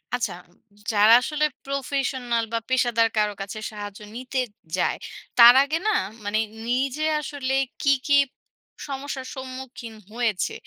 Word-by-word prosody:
আচ্ছা। 230 -6 -2 0.6
যারা 210 +1 +6
আসলে 300 +3 0 0.2
professional 265 -3 -1
বা - - +2
পেশাদার 240 -3 +3
কারো 210 -1 +2
কাছে 200 +2 -6
সাহায্য 205 -1 -8 0.2
নিতে 255 +2 -3 0.4
যায়, - - +1 0.4
তার 240 0 +11
আগে 295 +3 -1
না, - - +4 0.3
মানে 205 +1 0 0.3
নিজে 265 +4 0 0.2
আসলে 275 -2 -3 0.3
কী, 280 - +4 0.2
কী 285 - +5 0.7
সমস্যার 275 -1 -5
সম্মুখীন 260 -3 -8 0.2
হয়েছে, 225 -5 -1
250 Hz, 125 wpm, -24 LUFS, 225-275 Hz, 0.7 s, তার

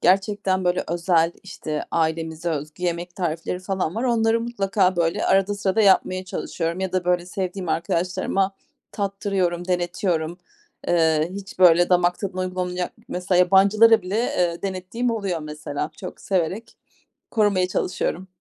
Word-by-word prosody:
gerçekten, 195 0 +2
böyle, 180 0 +1
özel, 170 0 +2
işte, 155 -5 -5
ailemize 160 +1 -1
özgü 155 +3 -5
yemek 175 0 -2
tarifleri 170 0 -2
falan 185 -2 -2
var. 230 - -2
Onları 230 -2 +2
mutlaka, 200 -5 +1
böyle, 165 -1 +1
arada 195 +1 +3
sırada 200 +1 0
yapmaya 185 -2 +3
çalışıyorum 170 -1 -3
ya 190 -1 -2
da, 185 -1 0
böyle, 180 -1 +1
sevdiğim 185 -1 -4
arkadaşlarıma 185 +4 0 0.4
tattırıyorum, 195 -3 -1
denetiyorum. 175 -2 -1 0.5
Eee, 160 -1 +2
hiç, 195 -2 -8
böyle, 175 -1 +6
damak 180 -1 +3
tadına 190 -2 -4
uygun 185 0 -3
olmayacak 180 0 -2 0.2
Mesela 180 0 0
yabancılara 200 +4 +5
bile, 185 +3 -3
eee, 180 -7 0
denettiğim 195 +5 -2
oluyor 200 -7 -2
mesela. 150 0 -5
Çok - - -8
severek 190 +4 -2 0.6
korumaya 205 -5 +2
çalışıyorum. 185 0 -2
180 Hz, 135 wpm, -23 LUFS, 170-195 Hz, 0.6 s, böyle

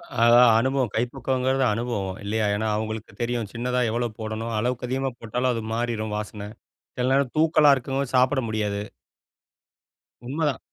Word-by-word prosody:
அ 115 - +2 0.3
அனுபவம் 130 -1 +1
கைப்பக்குவம்ங்கிறது 130 +3 0
அனுபவம், 105 -5 -3
இல்லையா? 105 +2 0
ஏன்னா 110 +2 -1
அவங்களுக்கு 110 0 -4
தெரியும். 120 -2 -1
சின்னதா 125 +2 -1
எவ்வளோ 120 +1 -1
போடணும், 110 +1 -4
அளவுக்கு 125 +2 -1
அதிகமா 135 +2 -1
போட்டாலும் 125 +3 -1
அது 115 - -3
மாறிரும் 115 -2 -2
வாசனை. 105 -1 -6 0.5
சில 125 0 0
நேரம் 135 -2 +2
தூக்கலா 155 -2 +5
இருக்கும், 135 +1 -2
சாப்பிட 130 +2 +3
முடியாது. 105 -2 -1 1.5
உண்மைதான். 145 +2 -1
120 Hz, 135 wpm, -24 LUFS, 110-130 Hz, 1.5 s, தூக்கலா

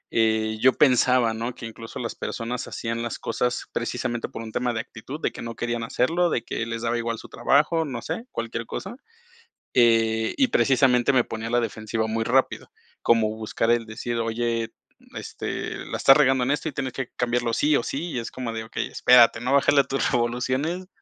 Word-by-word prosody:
eh, 110 -1 +2
yo 130 0 +6
pensaba, 125 -4 +4
¿no?, 115 +2 -4
que - - -8
incluso 115 0 -9
las 115 -2 -3
personas 115 +1 -4
hacían 115 0 -4
las 120 -1 -4
cosas, 120 +1 -1
precisamente, 120 -1 -2
por 115 - -7
un 110 - -8
tema 125 +2 -1
de 110 - -2
actitud, 135 +4 -9
de - - 0
que - - -9
no 115 -1 -6
querían 120 0 -2
hacerlo, 165 +9 +1
de 120 - -1
que 115 - -3
les 115 0 -4
daba 120 0 0
igual 115 0 -2
su - - -11
trabajo, 155 +4 +2
no 125 -5 -5
sé, 230 - -4
cualquier 115 0 -4
cosa. - - -6 0.8
Eh, 115 -2 +3
y 270 - +4
precisamente 130 - +3
me 125 -2 +3
ponía 115 0 -5
a - - -6
la 120 - +3
defensiva 110 -1 -2
muy 115 +1 -1
rápido, 130 +3 0 0.3
como 115 -2 +3
buscar 110 +1 -2
el 120 -1 +2
decir: 115 +2 -4
"Oye, 115 0 -1 0.4
este, - - -5
la - - -4
estás 135 - +7
regando 135 -3 +3
en 130 - +1
esto, 150 +2 -1
y - - -7
tienes 130 -1 -3
que 135 -2 -4
cambiarlo 120 -1 0
sí, 150 +5 +3
o 120 - +1
sí", 165 +8 -4
y 125 - -2
es 115 - -6
como 125 -3 -5
de: 110 0 -4
"Okey, 110 - -4
espérate, 120 -2 +5
¿no? 125 +3 0
bájale 140 0 +5
a - - -4
tus 135 +1 -1
revoluciones, 130 +9 -1
120 Hz, 205 wpm, -24 LUFS, 115-130 Hz, 0.8 s, estás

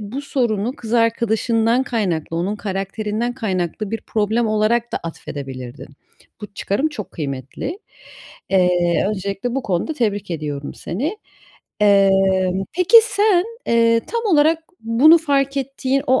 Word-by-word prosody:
bu 215 +7 -5
sorunu 240 -4 -1
kız 225 -1 -8
arkadaşından 230 +1 +2
kaynaklı, 180 - -2
onun 195 +5 -1
karakterinden 210 +4 -3
kaynaklı 195 -3 -3
bir 225 - -3
problem 220 +2 0
olarak 225 +3 +1
da - - 0
atfedebilirdin. 135 -5 -7 0.5
Bu 210 -1 -10
çıkarım 265 +13 -1
çok 215 -9 -7
kıymetli. 140 - -5 0.7
Eee, 180 -2 +2
öncelikle 200 +4 -3
bu 270 - -1
konuda 190 - -1
tebrik 205 -7 -1
ediyorum 150 -3 -4
seni. 295 - -4 0.6
Eee, 200 -1 +5 0.7
peki, 365 +6 +5
sen, 410 -5 +2 0.2
eee, 230 0 +3
tam 465 0 -2
olarak 315 +2 +4 0.2
bunu 255 +9 +5
fark 280 -3 0
ettiğin 270 0 -1
o 260 0 +3
220 Hz, 125 wpm, -20 LUFS, 195-260 Hz, 0.7 s, Eee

